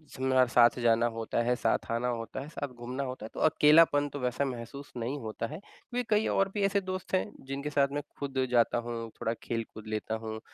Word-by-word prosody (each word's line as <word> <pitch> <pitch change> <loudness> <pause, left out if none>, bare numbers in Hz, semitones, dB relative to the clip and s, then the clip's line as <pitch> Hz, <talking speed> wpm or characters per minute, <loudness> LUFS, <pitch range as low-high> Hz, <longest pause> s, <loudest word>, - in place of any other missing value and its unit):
शिमला 130 -1 +3
साथ 120 +1 +6
जाना 115 0 +4
होता 115 +1 -1
है, 125 +1 +2
साथ - - 0
आना 115 +2 0
होता 115 -1 -3
है, 140 - -7
सब 145 -3 -5
घूमना 125 +3 -4
होता 130 -4 -5
है - - -7
तो - - -6
अकेलापन 150 -1 +5
तो 145 - -6
वैसा 125 +2 0
महसूस 130 +2 -6
नहीं 120 +5 -2
होता 110 -1 -4
है। 155 +6 -7
क्योंकि 245 +4 -6
कई 215 0 +3
और 195 0 +2
भी 210 - -1
ऐसे 200 0 +2
दोस्त 185 0 -5
हैं, 185 - +2 0.2
जिनके 140 +2 -4
साथ 140 -1 +3
मैं 145 +1 -2 0.2
खुद 135 -2 -3
जाता 120 -1 +3
हूँ, 115 -1 -4
थोड़ा 115 - 0
खेल 115 -1 -2
कूद 110 0 -10
लेता 110 +1 -2
हूँ, 110 0 -4
130 Hz, 220 wpm, -30 LUFS, 115-145 Hz, 0.2 s, साथ